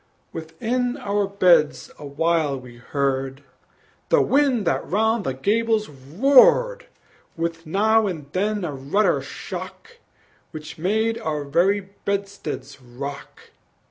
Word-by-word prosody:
Within 235 - -2
our 205 -3 -1
beds 180 -6 +3
awhile 150 0 0
we 125 -2 -13
heard 135 +1 -2 0.7
The - - +5
wind 270 -6 +2
that - - 0
round 220 +2 +1
the 130 - -2
gables 215 +7 +1
roared, 270 - +4 0.5
With 165 0 -3
now 215 +5 +3
and 160 -7 -5
then 205 +2 -1
a 150 - -4
ruder 140 +11 +1
shock, 470 0 -8 0.5
Which 155 0 -9
made 220 +6 0
our 150 -2 -3
very 180 +8 +2
bedsteads 195 -8 -5
rock. 130 +3 -9
180 Hz, 110 wpm, -23 LUFS, 145-220 Hz, 0.7 s, The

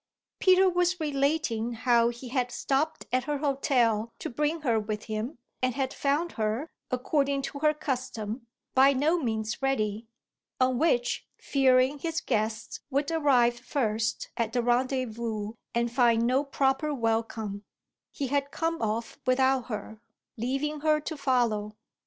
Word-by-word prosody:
Peter 375 0 +5
was 360 0 +1
relating 275 -6 0
how 235 0 +3
he 240 +1 -8
had 250 -1 0
stopped 285 +5 -1
at 255 0 +2
her 295 0 -1
hotel 250 -6 +1
to - - -5
bring 300 +5 -1
her 235 -6 +2
with 210 0 -4
him 220 +5 -4 0.2
and 255 -1 +1
had 270 -1 -1
found 295 +5 0
her, 220 +7 -1 0.2
according 275 +2 +1
to 280 - -5
her 305 +1 +4
custom, 250 -6 -4 0.3
by 270 +1 +6
no 305 +6 +2
means 220 -4 -2
ready; 225 -5 0 0.5
on 255 -1 +2
which, 245 -7 +1
fearing 265 0 +3
his 325 +1 -2
guests 220 -2 -2
would 280 +2 0
arrive 255 -7 +3
first 225 -4 -1
at 230 -1 -1
the 245 - +1
rendezvous 235 -4 -1 0.2
and 235 0 +1
find 235 -2 +3
no 255 +3 +2
proper 275 +1 +1
welcome, 225 -4 -1 0.5
he 280 - -3
had 280 +1 0
come 330 +2 -2
off 225 +1 -2
without 260 -1 +3
her, 215 -1 -6 0.3
leaving 275 +6 -2
her 305 0 +3
to 310 +1 -5
follow. 235 -7 0
255 Hz, 145 wpm, -28 LUFS, 230-285 Hz, 0.5 s, by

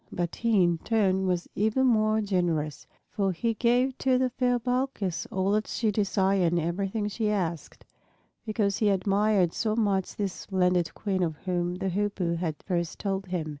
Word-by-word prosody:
But 175 -1 -3
he 225 -5 +3
in 170 -1 +1
turn 190 -3 +1
was 180 -1 -1
even 220 +6 +1
more 215 -3 +3
generous. 175 -7 -1 0.2
For 195 -2 0
he 230 +7 -1
gave 245 +3 +2
to 260 -1 +3
the 255 -1 +1
fair 245 0 +1
Balkis 245 -7 -2
all 190 +1 0
that 215 +1 +1
she 220 -2 0
desired 195 -3 +1
and 175 - +2
everything 195 +6 -2
she 210 +1 -1
asked, 175 -6 -3 0.6
because 210 -3 0
he 215 - +2
admired 195 -1 +2
so 215 -2 -1
much 200 -4 0
this 200 -3 -2
splendid 180 -3 0
Queen 195 -3 -2
of 165 -3 0
whom 175 -1 -1
the 190 +1 -2
Hoopoe 190 -3 -1
had 165 -3 -2
first 170 -3 -2
told 195 -1 -3
him. 175 -4 -3
195 Hz, 170 wpm, -27 LUFS, 180-215 Hz, 0.6 s, he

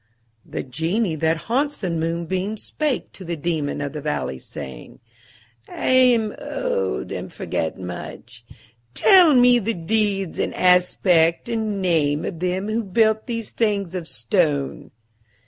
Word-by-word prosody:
The - - -5
Genie 165 - -1
that 160 +1 0
haunts 280 +5 0
the 185 -4 -3
moonbeams 170 +5 -2
spake 300 -5 -2
to 190 - -10
the 170 -1 -3
Daemon 150 -2 -2
of 145 0 -4
the 150 - -5
Valley, 140 - -3
saying, 65 -3 -9 0.7
"I - - -3
am 245 -4 +4
old, 95 - -2
and - - -5
forget 80 - -3
much. 110 +6 -8 0.5
Tell 360 -7 +6
me 245 0 +6
the 230 +1 -2
deeds 195 0 -1
and - - -1
aspect 180 0 +3
and 215 -4 -2
name 155 -4 +1
of 170 - -5
them 185 +3 -1
who 225 +2 -1
built 220 +3 +2
these 230 -3 -4
things 200 -5 0
of 175 -3 -4
stone." 145 - -1
180 Hz, 140 wpm, -22 LUFS, 160-220 Hz, 0.7 s, Tell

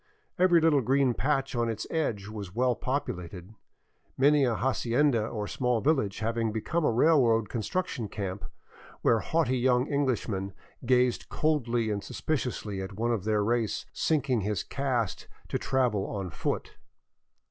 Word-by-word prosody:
Every 180 -2 +5
little 155 -3 +4
green 130 +1 +2
patch 135 +1 0
on 120 -1 +1
its 110 -1 -3
edge 115 -12 -1
was 105 -3 -7
well 125 +1 +2
populated; 95 -8 -4 0.6
many 145 +2 +5
a 120 -3 +1
hacienda 120 +1 +1
or 105 -3 -4
small 125 0 0
village 115 -7 0
having 115 0 0
become 135 +10 -1
a - - +3
railway 120 -3 +4
construction 120 - -3
camp 100 -1 -5 0.6
where 115 - +4
haughty 130 -2 0
young 125 +1 +2
Englishmen 110 -8 -1 0.3
gazed 125 -1 +2
coldly 120 -8 0
and 100 -1 -2
suspiciously 120 -9 -3
at 95 +1 -6
one 120 +2 0
of 105 -5 -2
their 105 -1 +2
race 115 -1 0
sinking 140 -7 +1
his 105 +1 -1
caste 125 - -2 0.2
to - - -1
travel 125 -7 0
on 95 -4 -4
foot. - - -3
120 Hz, 145 wpm, -28 LUFS, 105-135 Hz, 0.6 s, Every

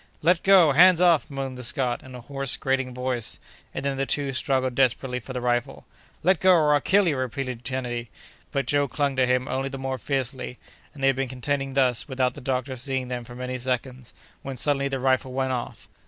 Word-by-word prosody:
"Let 175 +2 +3
go! 190 -6 +6
hands 175 +4 +6
off!" 175 -4 +4
moaned 135 -2 -5
the - - -6
Scot, 125 0 +1
in 130 -1 -11
a 125 - -8
hoarse, 135 +1 +1
grating 135 -1 -1
voice—and 125 +1 -5
then 140 -1 -1
the 135 0 -1
two 140 -2 0
struggled 130 -1 0
desperately 125 0 +1
for 125 - -10
the 125 -1 -4
rifle. 120 -1 -1 0.4
"Let 180 0 +3
go, 185 0 +5
or 155 -4 +4
I'll 145 - +3
kill 195 0 +3
you!" 155 - +1
repeated 130 -1 -4
Kennedy. 120 -2 -4 0.4
But 140 -3 -1
Joe 145 +2 +1
clung 140 0 -1
to 130 -1 +3
him 125 +1 +1
only 135 +1 -2
the 135 - -6
more 135 -1 -4
fiercely, 130 -1 -3 0.4
and 140 - -9
they - - +5
had 135 - +1
been 135 0 -1
contending 135 +1 -3
thus 125 -3 +2
without 130 -2 0
the - - -10
doctor 130 +1 -2
seeing 130 0 -2
them 125 -1 -4
for 120 +1 -11
many 125 0 -4
seconds, 125 0 -3 0.3
when, 135 -1 -6
suddenly 140 +1 +1
the 135 -1 -3
rifle 130 0 +1
went 130 0 -1
off. 125 -2 -5
130 Hz, 215 wpm, -25 LUFS, 125-140 Hz, 0.4 s, go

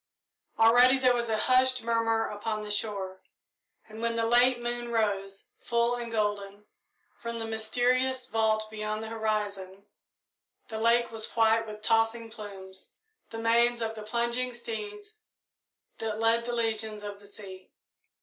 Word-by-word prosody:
Already 245 +3 +6
there 255 -1 +4
was 235 -1 -1
a 220 - +1
hushed 255 +2 +3
murmur 225 -1 +1
upon 215 +1 -4
the 210 0 -5
shore, 195 -3 -3 0.7
and 220 +1 -10
when 230 0 0
the 230 0 +1
late 245 +2 +4
moon 240 0 -3
rose, 200 -3 -1
full 235 0 +1
and 240 -1 -4
golden, 205 -2 -2 0.5
from 235 0 -5
the 225 - -3
mysterious 250 +4 +1
vault 220 -2 +1
beyond 215 0 -3
the 220 - -6
horizon, 205 -3 -3 0.8
the 220 -1 -4
lake 235 +1 +3
was 220 -1 +1
white 225 0 +3
with 215 0 -9
tossing 225 +1 +1
plumes 190 -3 -9 0.4
the 225 - -7
manes 235 +1 +3
of 225 -1 -2
the 220 - -8
plunging 235 +3 -1
steeds 415 - -7 0.8
that 220 -1 -3
lead 230 +1 +3
the 240 - -3
legions 220 -2 -2
of 205 -1 -7
the 205 - -16
sea. 190 -2 -12
225 Hz, 150 wpm, -28 LUFS, 215-235 Hz, 0.8 s, Already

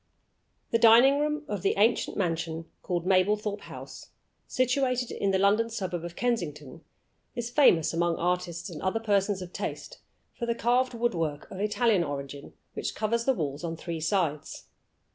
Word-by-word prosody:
The 230 - +3
dining 240 +5 +7
room 300 +1 -1
of 205 -3 -3
the 195 - +1
ancient 220 +4 +2
mansion 165 -3 -2 0.2
called 175 -2 -2
Mablethorpe 205 +2 +1
House, - - -10 0.4
situated 255 -1 0
in 200 - -1
the 190 - +2
London 205 +4 +3
suburb 185 -6 -4
of 175 0 -7
Kensington, 165 - -3 0.5
is 240 -1 -4
famous 210 - +4
among 170 0 +1
artists 175 0 -2
and 155 - -8
other 190 +4 0
persons 200 -3 +1
of 180 - -11
taste - - -5 0.3
for 235 - -5
the 235 - 0
carved 245 +2 +1
wood 240 0 0
work, 155 -4 -2
of 190 - -7
Italian 210 -2 +2
origin, 140 -1 -6 0.2
which - - -4
covers 230 +2 0
the 265 - +4
walls 145 -4 -3
on 165 -1 -4
three 165 -1 -5
sides. 160 -3 -1
195 Hz, 160 wpm, -28 LUFS, 170-235 Hz, 0.5 s, dining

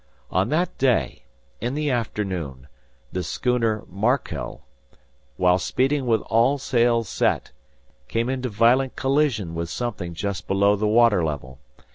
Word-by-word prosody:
On 95 +5 +1
that 170 +4 0
day, 130 - +1 0.3
in 120 +4 -2
the 150 -1 0
afternoon, 95 - -3 0.4
the 90 - -2
schooner 115 - 0
'Markel' 115 +8 -2 0.7
while 90 0 +3
speeding 135 +6 0
with 115 -2 +3
all 120 +5 +2
sails 120 -4 +1
set, - - 0 0.6
came 115 - -1
into 130 -1 -2
violent 120 +5 +3
collision 135 - +1
with 85 0 -3
something 95 -8 -4
just 100 +2 -4
below 100 +1 +3
the 105 +1 0
water 110 -4 +4
level. 65 -4 -4
115 Hz, 130 wpm, -23 LUFS, 95-125 Hz, 0.7 s, water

